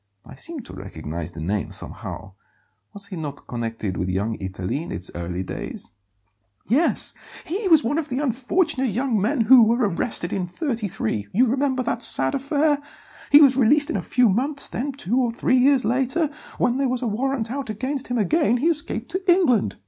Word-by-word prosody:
I - - -12
seem 330 -4 -7
to - - -11
recognize 80 -3 -6
the 80 - -9
name, 100 +5 -2
somehow; 95 - -6 0.6
was 200 0 -9
he 200 -2 -8
not 145 -4 -6
connected 115 -5 -4
with 90 +2 -2
Young 100 +5 -1
Italy 95 +7 -4
in 170 - -8
its 90 +1 -5
early 90 +2 -4
days?" - - -7 0.7
"Yes; 275 - +2 0.3
he 390 +5 -2
was 320 -4 +5
one 290 +7 0
of 310 - -5
the 250 - -2
unfortunate 270 +2 0
young 230 0 0
men 240 +5 +1
who 245 +3 +7
were 230 +1 +3
arrested 170 -1 -2
in 185 -2 -2
'33 200 - -3
you 245 +6 +4
remember 260 +1 0
that 235 0 -2
sad 135 - +5
affair? 290 +2 +1 0.5
He 290 - +9
was 270 -3 +6
released 285 +5 +3
in - - -2
a - - -1
few 250 -1 +2
months; 270 +8 0
then, 280 +4 -3
two 245 -3 -2
or 245 - +1
three 255 +2 +1
years 265 0 +4
later, 265 +6 0 0.3
when 245 +1 +1
there 270 -1 +1
was 255 0 -2
a - - 0
warrant 235 +1 -2
out 275 -2 -4
against 260 +6 -3
him 245 - -2
again, 245 - +2
he 300 +7 +2
escaped 295 -4 -2
to 375 +1 +1
England. 255 - +2
245 Hz, 190 wpm, -23 LUFS, 175-280 Hz, 0.7 s, He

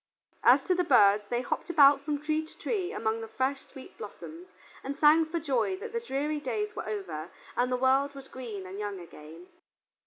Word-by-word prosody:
As - - +6
to 370 - +1
the 360 0 +1
birds, 205 - +5
they 240 0 0
hopped - - -3
about 285 -4 +6
from 290 0 -2
tree 310 +1 0
to 315 - -15
tree 380 -5 -2
among 220 +1 -2
the 225 - -6
fresh, 265 +4 -1
sweet 270 +8 -13
blossoms, 335 +3 -9 0.4
and 275 +1 -5
sang 310 +2 +5
for 335 +1 -2
joy 285 +3 0
that 445 +3 -8
the 465 - 0
dreary 300 - -2
days 420 +7 -3
were - - -5
over 175 -6 -5 0.3
and 245 +2 +1
the 250 - +1
world 270 +2 +2
was 270 -1 -10
green 225 -7 -7
and 190 +2 -8
young 205 -2 -4
again. 165 0 -12
275 Hz, 205 wpm, -29 LUFS, 220-315 Hz, 0.4 s, As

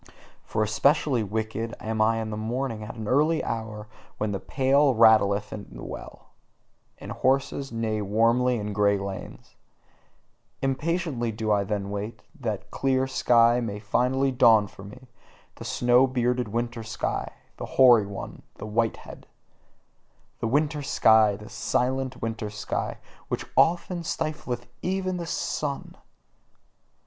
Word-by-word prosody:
For 110 - -1
especially 135 +4 +2
wicked 110 +2 -3
am 110 0 -2
I 115 +1 +3
in 110 -1 -4
the - - -3
morning: 115 +1 -3
at 105 - -8
the 110 -2 -6
early 155 +6 +2
hour 110 -2 -4 0.3
when 105 -1 -1
the 100 - -2
pail 135 +3 +2
rattleth 110 -3 +4
at 105 - -8
the - - -9
well, - - -9 0.7
and - - -9
horses 135 +1 0
neigh 110 -2 -1
warmly 115 +5 +2
in 105 -1 -4
grey 100 0 +3
lanes: 100 -1 -7 1.0
Impatiently 135 -3 -1
do 110 0 -2
I 100 -1 +3
then 100 -1 -3
wait, 105 +3 -5 0.2
that 110 -6 -2
the - - -28
clear 130 -1 +1
sky 120 -2 +4
may 110 -4 -3
finally 125 +6 +1
dawn 115 -4 +5
for 95 - -13
me, 130 +6 -12 0.5
the - - -9
snow 125 +2 +3
bearded 125 -1 0
winter 120 +2 -3
sky, 110 0 -3 0.3
the - - -5
hoary 120 -6 +7
one, 100 -1 -7
the - - -8
white 115 +1 0
head, - - -12 1.1
The - - -1
winter 150 +4 +1
sky, 110 -6 +4
the 105 +1 -11
silent 130 0 -1
winter 115 -2 -3
sky, 105 0 -3 0.3
which - - -3
often 175 +1 +2
stifleth 150 -7 -3 0.2
even 185 0 -1
its 170 -1 -5
sun! 145 -4 -3
115 Hz, 140 wpm, -26 LUFS, 110-130 Hz, 1.1 s, hoary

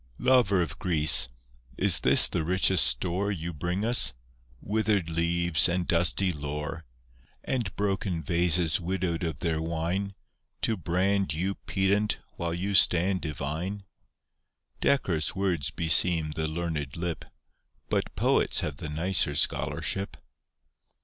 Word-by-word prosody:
Lover 120 -8 +3
of 80 - -7
Greece, 80 -7 +5 0.5
is - - +4
this - - +6
the 85 - -3
richest 95 +1 +4
store 90 +10 -1
You 85 -2 -5
bring 90 +7 -3
us, 115 - +3 0.5
withered 105 -5 -1
leaves 85 0 +2
and 90 0 -1
dusty 90 +3 +2
lore, 75 +2 -6 0.6
And 120 -8 -2
broken 95 -4 -2
vases 85 +1 +2
widowed 90 -1 -3
of 80 -2 -4
their 80 -2 -1
wine, 85 +5 -3 0.5
To 115 - +1
brand 95 -1 -1
you 95 +5 -2
pedant 100 +2 -1 0.2
while 85 0 -3
you 95 +4 -3
stand 95 0 +3
divine? 80 +7 -5 1.0
Decorous 95 - 0
words 90 -8 -1
beseem 80 +1 +2
the 80 +1 -3
learned 80 -2 -4
lip, 85 -1 -4 0.6
But - - -2
Poets - - +1
have - - -4
the 75 - -6
nicer 80 -1 +1
scholarship. 100 +6 -1
85 Hz, 125 wpm, -27 LUFS, 80-95 Hz, 1.0 s, this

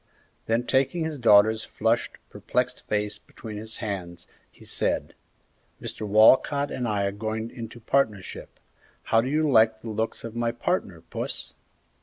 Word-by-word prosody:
Then 115 +2 +1
taking 135 +6 +1
his 160 -3 -4
daughter's 110 -1 +5
flushed, 115 +2 0 0.2
perplexed 125 0 -2
face 105 0 -1
between 110 -2 -10
his 110 +1 -7
hands, 95 -6 -5 0.2
he - - -17
said, - - -1 0.7
"Mr. 110 - -5
Walcott 130 +7 +5
and 125 - -2
I 105 -2 0
are 100 - 0
going 110 +2 -4
into 115 -1 -8
partnership; 110 -5 -1 0.4
how 115 - +3
do 125 - -3
you 155 +2 +2
like 110 -4 +4
the 115 - -6
looks 110 +1 -2
of 115 0 -7
my 120 0 0
partner, 120 - -2
Puss?" - - -5
110 Hz, 150 wpm, -26 LUFS, 105-125 Hz, 0.7 s, daughter's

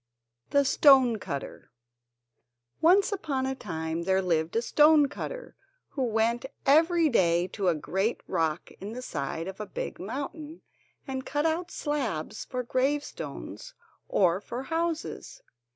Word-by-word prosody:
] 120 +1 -51
The 280 0 +5
Stone 260 -5 +5
Cutter 140 -7 -6 1.1
Once 380 +6 +5
upon 295 -10 -2
a 265 - -1
time 160 -8 -4
there 190 +2 +2
lived 165 -2 0
a 230 - +3
stone 300 +2 +5
cutter, - - -7 0.3
who 275 - -5
went 230 0 +1 0.2
every 325 +4 +5
day 175 - +3
to 195 0 -2
a 175 - +3
great 190 +9 -1
rock 160 -4 -1
in 205 +3 -6
the 250 +1 -6
side 160 - -4
of 190 +1 -7
a 210 - -5
big - - -5
mountain 290 - -6 0.4
and 265 -1 -3
cut 295 +3 -1
out 335 +2 0
slabs 250 - -3
for 250 -1 -3
gravestones 290 - -3 0.3
or 185 -1 +3
for 240 +4 -6
houses. 335 - -3
250 Hz, 140 wpm, -28 LUFS, 185-300 Hz, 1.1 s, The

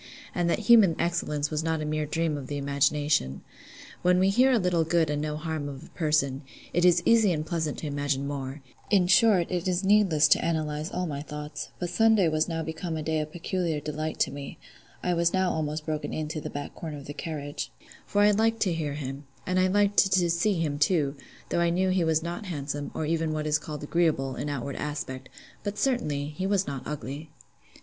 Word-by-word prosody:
and 175 -1 0
that - - +2
human 215 -6 +6
excellence 155 -3 -1
was 155 0 -1
not 160 -1 0
a 155 - -3
mere 155 0 -1
dream 160 0 0
of 140 -3 -6
the 145 - -3
imagination. 140 - +1 0.6
When 180 0 +4
we 190 +1 +4
hear 255 +6 +4
a 250 - +4
little 180 -5 +2
good 160 -1 +2
and 145 0 -1
no 150 0 -2
harm 155 -2 -3
of 135 -1 -8
a - - -13
person, 150 -4 +1 0.3
it 175 - +2
is 175 -1 +5
easy 225 -4 +5
and 155 -2 -1
pleasant 160 -3 -2
to - - -6
imagine 145 -1 -1
more: 140 0 -5 0.3
in 195 -4 +4
short, 190 -2 +4
it 180 0 -1
is 180 +1 0
needless 190 -7 +5
to - - +4
analyse 155 -1 -1
all 180 - -2
my 145 -4 -4
thoughts; 150 0 -6
but 175 -1 -3
Sunday 220 0 +4
was 155 0 +1
now 165 -1 -2
become 160 +1 -4
a 155 - -4
day 160 0 0
of 155 0 -4
peculiar 170 -2 -2
delight 155 +1 -4
to - - +2
me 140 -1 -7 0.5
(I 180 - +1
was 170 0 +2
now 190 -1 +2
almost 155 0 -2
broken 155 -1 -3
in 155 -1 -2
to 155 0 -4
the - - -5
back 145 0 -6
corner 155 -3 -6
in 140 - -9
the 145 - -7
carriage), 145 -1 -5 0.4
for 205 - +2
I 210 - +6
liked 225 +2 +1
to 185 -4 +2
hear 155 -3 -2
him—and 140 +5 -4
I 185 - +4
liked 205 +1 +2
to 180 -2 +3
see 180 +5 +2
him, 150 -4 -1
too; 150 -3 +2 0.3
though - - 0
I 170 - +3
knew 185 +2 +1
he 185 -1 +2
was 160 -1 +2
not 175 +5 -5
handsome, 145 -3 -4
or 160 - -1
even 160 0 0
what 155 0 -2
is 155 0 +2
called 150 -2 -7
agreeable, 145 -5 +1
in 150 - -3
outward 140 -1 -4
aspect; 135 -3 -5 0.3
but, 205 0 -3
certainly, 150 - 0
he 185 +5 -3
was 195 -1 +2
not 140 -2 -4
ugly. 150 +2 -6
160 Hz, 220 wpm, -27 LUFS, 145-180 Hz, 0.6 s, human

